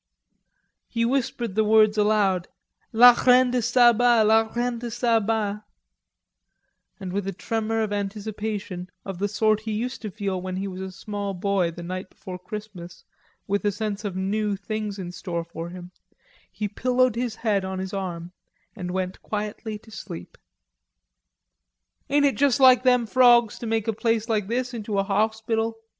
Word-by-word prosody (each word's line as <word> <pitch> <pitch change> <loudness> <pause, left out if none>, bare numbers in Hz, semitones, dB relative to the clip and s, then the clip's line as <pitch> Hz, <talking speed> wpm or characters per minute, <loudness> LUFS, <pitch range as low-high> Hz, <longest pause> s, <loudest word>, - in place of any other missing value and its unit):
He 230 -1 -1
whispered 240 -4 -1
the 220 +2 +2
words 215 0 +5
aloud, 205 -4 +2 0.4
"la 245 +2 +9
reine 250 +1 +4
de 250 -1 +1
Saba, 240 -1 +5
la 220 +1 +3
reine 240 0 -1
de 240 0 -5
Saba"; 220 -3 0 1.4
and, 185 -2 -6
with 200 0 -2
a - - -1
tremor 225 +3 -2
of 210 -1 -2
anticipation 205 -2 -4 0.2
of 195 -2 -6
the 205 - +1
sort 215 +1 +2
he 220 0 -4
used 240 +4 -3
to 215 - -4
feel 195 -2 -3
when 185 0 -4
he 195 +1 -3
was 185 -1 -6
a 190 0 -5
small 200 +1 -5
boy 190 -1 +1
the 170 +1 -9
night 185 +2 -5
before 180 -1 -9
Christmas, 180 -4 -9 0.4
with 200 +1 -1
a 205 - +2
sense 210 0 -4
of 200 -3 -4
new; 205 +2 -1
things 210 +1 -4
in 180 -2 -6
store 175 -2 -4
for 170 0 -7
him, 180 0 -10 0.6
he 210 - -3
pillowed 250 +3 +1
his 240 -2 -2
head 210 -4 0
on 190 0 -4
his 190 +1 -5
arm 175 -3 -4 0.4
and 180 -4 -5
went 185 0 -3
quietly 210 +1 -4
to 220 +1 -18
sleep. 85 - -9 1.7
"Ain't 285 +1 +3
it 275 - +1
juss 280 -1 +3
like 255 -2 +7
them 250 -2 +3
frawgs 240 -2 +4
te 235 - -5
make 225 -1 -1
a 225 - +1
place 225 0 0
like 215 -4 0
this' 250 +2 -2
into 215 -3 -3
a 195 - +3
hauspital?" 220 +2 0
215 Hz, 170 wpm, -24 LUFS, 195-230 Hz, 1.7 s, la